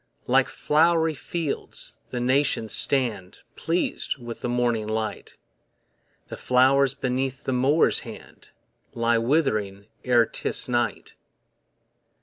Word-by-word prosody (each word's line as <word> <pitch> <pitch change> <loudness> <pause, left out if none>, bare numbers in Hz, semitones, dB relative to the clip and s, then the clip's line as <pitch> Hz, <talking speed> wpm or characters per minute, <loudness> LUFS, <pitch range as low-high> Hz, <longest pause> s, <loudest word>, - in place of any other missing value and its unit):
Like - - +3
flow'ry 160 +1 +2
fields 155 +2 -4
the 125 - -4
nations 130 -3 +1
stand 115 -9 -1
Pleas'd 165 -2 -2
with 120 -2 -8
the 125 - -3
morning 120 -3 0
light; 110 0 -4 0.9
The - - -7
flowers 130 +1 +3
beneath 130 +1 -2
the 130 - -2
Mower's 135 +6 +3
hand - - -12 0.5
Lie 115 0 +2
withering 110 -7 0 0.2
e'er 120 -2 +4
'tis - - -2
night. 120 -1 -2
125 Hz, 110 wpm, -24 LUFS, 115-140 Hz, 0.9 s, e'er